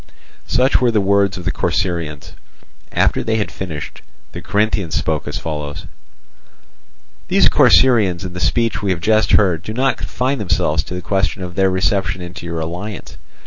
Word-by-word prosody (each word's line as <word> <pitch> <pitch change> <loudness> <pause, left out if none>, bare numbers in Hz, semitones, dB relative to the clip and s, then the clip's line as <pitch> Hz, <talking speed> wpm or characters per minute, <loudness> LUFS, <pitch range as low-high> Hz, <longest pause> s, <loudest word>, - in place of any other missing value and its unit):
Such 130 +2 +2
were 125 - +4
the 110 -2 +2
words 100 -1 +2
of 90 - -8
the - - +1
Corcyraeans. 85 -4 -2 0.6
After - - +1
they 110 - 0
had 105 - -2
finished, 80 -7 -7 0.3
the - - -7
Corinthians 100 -5 0
spoke 80 -2 -1
as 75 - -3
follows: 75 -2 -5 1.4
"These - - +4
Corcyraeans 100 -8 +4
in 90 - -6
the 90 - -6
speech 115 +3 0
we 100 - -1
have 90 -3 0
just 110 +4 +2
heard 90 -6 +3
do 110 - -6
not 135 +2 +1
confine 130 +2 -2
themselves 85 -6 0
to 90 - -6
the 90 - -6
question 95 +1 -1
of 90 -1 -6
their 95 +1 +2
reception 95 0 0
into 90 -1 -8
your 85 -1 -3
alliance. 90 +6 -6
95 Hz, 170 wpm, -18 LUFS, 85-105 Hz, 1.4 s, were